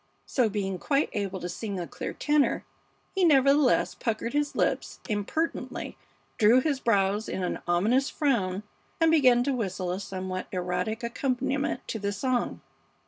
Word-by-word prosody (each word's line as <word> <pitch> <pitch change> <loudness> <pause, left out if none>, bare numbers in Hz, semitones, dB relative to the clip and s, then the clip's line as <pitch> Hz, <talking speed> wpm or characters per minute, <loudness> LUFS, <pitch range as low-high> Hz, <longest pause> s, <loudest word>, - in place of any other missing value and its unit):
So, 245 -5 +1
being 195 -3 -2
quite 280 0 +1
able 195 -2 -2
to 175 - -3
sing 195 +2 -4
a 175 - -3
clear 150 - -5
tenor, 295 -1 +1 0.5
he 385 - +1
nevertheless 280 -3 +4
puckered 230 0 -2
his 290 0 0
lips - - -1
impertinently, 215 +11 -2 0.4
drew 225 +3 +6
his 280 0 0
brows 205 -2 +1
in 190 - -3
an 180 - -2
ominous 220 +11 +2
frown, 205 -9 0 0.4
and 325 -1 +4
began 255 -6 +5
to 280 +1 0
whistle 185 -6 -2
a 185 - -2
somewhat 185 -2 -5
erratic 180 +5 -2
accompaniment 265 +3 -1
to 220 - -3
the 200 0 -1
song. 245 +4 -1
225 Hz, 150 wpm, -27 LUFS, 190-270 Hz, 0.5 s, drew